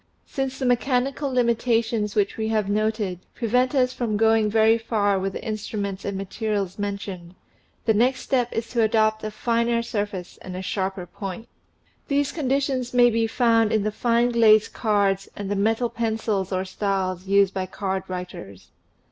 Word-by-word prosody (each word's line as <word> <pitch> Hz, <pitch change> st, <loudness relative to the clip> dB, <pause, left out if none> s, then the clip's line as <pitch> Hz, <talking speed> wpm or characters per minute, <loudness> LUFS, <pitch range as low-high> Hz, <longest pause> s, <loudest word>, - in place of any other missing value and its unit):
Since 270 Hz, -1 st, -3 dB
the 265 Hz, -, -2 dB
mechanical 255 Hz, +3 st, +1 dB
limitations 230 Hz, -3 st, +1 dB
which 205 Hz, -2 st, +1 dB
we 220 Hz, -1 st, -2 dB
have 215 Hz, -2 st, 0 dB
noted 210 Hz, -3 st, -1 dB, 0.2 s
prevent 250 Hz, +3 st, +1 dB
us 255 Hz, -1 st, +2 dB
from 230 Hz, -5 st, -1 dB
going 220 Hz, 0 st, +3 dB
very 220 Hz, +1 st, +4 dB
far 205 Hz, -3 st, +1 dB
with 195 Hz, 0 st, -2 dB
the -, -, -6 dB
instruments 205 Hz, -2 st, -4 dB
and 200 Hz, -1 st, -3 dB
materials 200 Hz, -1 st, -3 dB
mentioned, 200 Hz, -3 st, -5 dB, 0.5 s
the 220 Hz, -, +4 dB
next 250 Hz, +5 st, +2 dB
step 245 Hz, -3 st, 0 dB
is 225 Hz, 0 st, -3 dB
to 235 Hz, -, 0 dB
adopt 220 Hz, -1 st, +2 dB
a 215 Hz, -, -2 dB
finer 235 Hz, +1 st, 0 dB
sur 210 Hz, -3 st, -1 dB
face 185 Hz, -4 st, -8 dB
and 185 Hz, -, -7 dB
a 185 Hz, -, -5 dB
sharper 190 Hz, -1 st, -2 dB
point. 195 Hz, +4 st, -7 dB, 0.6 s
These 280 Hz, 0 st, +1 dB
conditions 270 Hz, -4 st, -1 dB
may 245 Hz, -1 st, +6 dB
be 225 Hz, 0 st, +1 dB
found 230 Hz, -2 st, +3 dB
in 215 Hz, -2 st, +2 dB
the 215 Hz, -, 0 dB
fine 235 Hz, +2 st, +2 dB
glazed 220 Hz, -2 st, +5 dB
cards 200 Hz, -3 st, +1 dB
and 200 Hz, -1 st, -5 dB
the -, -, +1 dB
metal 225 Hz, +4 st, +1 dB
pencils 220 Hz, -4 st, -1 dB
or 185 Hz, 0 st, -1 dB
styles 190 Hz, -1 st, -2 dB
used 195 Hz, 0 st, +4 dB
by 185 Hz, -1 st, -2 dB
card 190 Hz, 0 st, -3 dB
writers. 180 Hz, -, -8 dB
220 Hz, 170 wpm, -24 LUFS, 195-235 Hz, 0.6 s, may